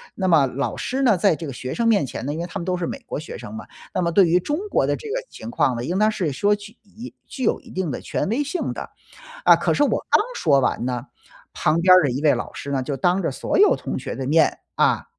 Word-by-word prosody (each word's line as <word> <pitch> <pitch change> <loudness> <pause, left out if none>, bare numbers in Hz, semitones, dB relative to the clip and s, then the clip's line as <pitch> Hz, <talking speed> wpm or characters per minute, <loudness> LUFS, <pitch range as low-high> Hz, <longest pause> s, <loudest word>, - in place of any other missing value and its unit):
那 190 -2 -1
么 155 -6 +5
老 135 +2 -3
师 265 +2 -2
呢， 220 -7 +4
在 185 -2 +3
这 165 - -7
个 135 - -6
学 130 +1 -5
生 230 -1 0
面 205 -11 +3
前 - - -6
呢， 145 - -2
因 160 - -5
为 170 - -2
他 195 - -6
们 170 - -5
都 185 - 0
是 175 - -2
美 275 - -5
国 150 - -4
学 155 - -8
生 105 - -9
嘛， 110 - -7 0.3
那 185 - 0
么 170 - 0
对 185 0 +5
于 175 +2 +3
中 295 - -2
国 - - +2
的 - - +1
这 450 - -9
个 - - -2
情 - - -9
况 145 - +1
呢， 120 - -4
应 180 +4 -1
当 215 +1 +4
是 175 -8 -2
说 205 +9 +2
具 205 +2 -12
以 225 +4 -11
具 260 - -6
有 - - +1
一 - - -16
定 185 -3 -2
的 - - -4
权 - - -2
威 265 +6 0
性 285 +6 -3
的。 - - -7 0.5
啊， - - +8
可 - - 0
是 290 - +2
我 - - 0
刚 - - +6
说 140 -4 +3
完 125 -1 0
呢， 125 0 -3 0.5
旁 155 +2 +1
边 185 0 +7
儿 185 - +6
的 140 - +1
一 130 +4 -3
位 150 - +4
老 - - -5
师 140 - -7
呢， 135 -2 0
就 140 +1 -3
当 180 +7 +2
着 145 - 0
所 130 - -2
有 415 - +6
同 - - -5
学 - - -5
的 135 -1 -4
面， 155 +1 +3 0.2
啊， - - +2
175 Hz, 310 characters per minute, -22 LUFS, 140-210 Hz, 0.5 s, 啊